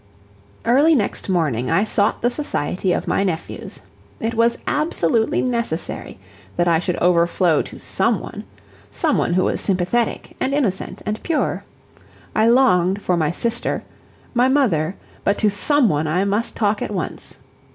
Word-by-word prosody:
Early 285 Hz, +7 st, +5 dB
next 210 Hz, -4 st, -1 dB
morning 145 Hz, -10 st, 0 dB
I 200 Hz, -, +3 dB
sought 210 Hz, -1 st, 0 dB
the 240 Hz, -, +3 dB
society 190 Hz, -, -1 dB
of -, -, -1 dB
my -, -, +1 dB
nephews. 170 Hz, -4 st, -4 dB, 0.4 s
It 225 Hz, +1 st, -2 dB
was 230 Hz, +1 st, +2 dB
absolutely 230 Hz, -, +1 dB
necessary 235 Hz, -, -3 dB, 0.4 s
that 175 Hz, -, +1 dB
I 165 Hz, -1 st, +4 dB
should 180 Hz, 0 st, -2 dB
overflow 170 Hz, -2 st, +3 dB
to -, -, -9 dB
SOME -, -, 0 dB
one -, -, -8 dB, 0.5 s
some -, -, 0 dB
one 175 Hz, -, 0 dB
who 185 Hz, +1 st, +2 dB
was -, -, -1 dB
sympathetic 195 Hz, +5 st, -1 dB
and 275 Hz, +1 st, 0 dB
innocent 210 Hz, -10 st, -2 dB
and 210 Hz, +1 st, -3 dB
pure. 330 Hz, -3 st, -1 dB, 0.7 s
I 220 Hz, +1 st, +4 dB
longed 200 Hz, -7 st, +4 dB
for 185 Hz, -3 st, 0 dB
my 160 Hz, -3 st, +1 dB
sister 235 Hz, +7 st, -2 dB, 0.5 s
my 245 Hz, +1 st, +3 dB
mother, 200 Hz, -, +1 dB, 0.3 s
but 200 Hz, -, +1 dB
to 210 Hz, -2 st, +2 dB
SOME 285 Hz, +6 st, +3 dB
one 155 Hz, -4 st, 0 dB
I 180 Hz, +6 st, +1 dB
must 205 Hz, +3 st, -1 dB
talk 205 Hz, -1 st, 0 dB
at -, -, -2 dB
once. 190 Hz, -5 st, -5 dB
200 Hz, 155 wpm, -20 LUFS, 175-235 Hz, 0.7 s, Early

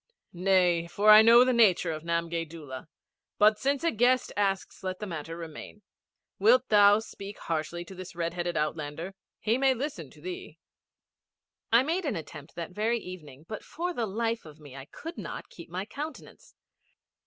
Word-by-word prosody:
'Nay, 180 Hz, -2 st, +2 dB
for 210 Hz, +4 st, +4 dB
I 215 Hz, 0 st, +11 dB
know 230 Hz, +2 st, +8 dB
the 255 Hz, 0 st, +2 dB
nature 195 Hz, -7 st, +4 dB
of 155 Hz, -1 st, -5 dB
Namgay 170 Hz, 0 st, -1 dB
Doola; 150 Hz, -5 st, -9 dB, 0.5 s
but 210 Hz, 0 st, +5 dB
since 280 Hz, +2 st, 0 dB
a 335 Hz, -, +2 dB
guest 245 Hz, +3 st, +2 dB
asks 195 Hz, -1 st, -1 dB
let 185 Hz, 0 st, -3 dB
the 210 Hz, -, -5 dB
matter 165 Hz, -3 st, -6 dB
remain. 165 Hz, +5 st, -9 dB, 0.6 s
Wilt 245 Hz, +5 st, +4 dB
thou 205 Hz, -1 st, +7 dB
speak 205 Hz, -2 st, -8 dB
harshly 170 Hz, +2 st, -3 dB
to 190 Hz, -, -11 dB
this 185 Hz, -2 st, -9 dB
red 170 Hz, 0 st, -2 dB
headed 175 Hz, -1 st, -2 dB
outlander. 155 Hz, +4 st, -3 dB, 0.3 s
He 225 Hz, +3 st, +1 dB
may 265 Hz, -1 st, +3 dB
listen 245 Hz, -, -5 dB
to 150 Hz, -, -18 dB
thee.' 175 Hz, -1 st, -7 dB, 1.1 s
I 235 Hz, +3 st, +6 dB
made 335 Hz, +5 st, -1 dB
an 285 Hz, -, -1 dB
attempt 150 Hz, -2 st, -9 dB
that 170 Hz, 0 st, -5 dB
very 220 Hz, +5 st, 0 dB
evening, 160 Hz, -, -10 dB
but 215 Hz, -, -6 dB
for 350 Hz, +2 st, -4 dB
the 235 Hz, -7 st, -2 dB
life 225 Hz, +3 st, -2 dB
of 155 Hz, -1 st, -13 dB
me 145 Hz, -3 st, -12 dB
I 135 Hz, -1 st, -8 dB
could 330 Hz, -, -9 dB
not -, -, -7 dB
keep 170 Hz, -, -12 dB
my 185 Hz, +3 st, -4 dB
countenance. 295 Hz, +5 st, -9 dB
190 Hz, 175 wpm, -28 LUFS, 165-230 Hz, 1.1 s, I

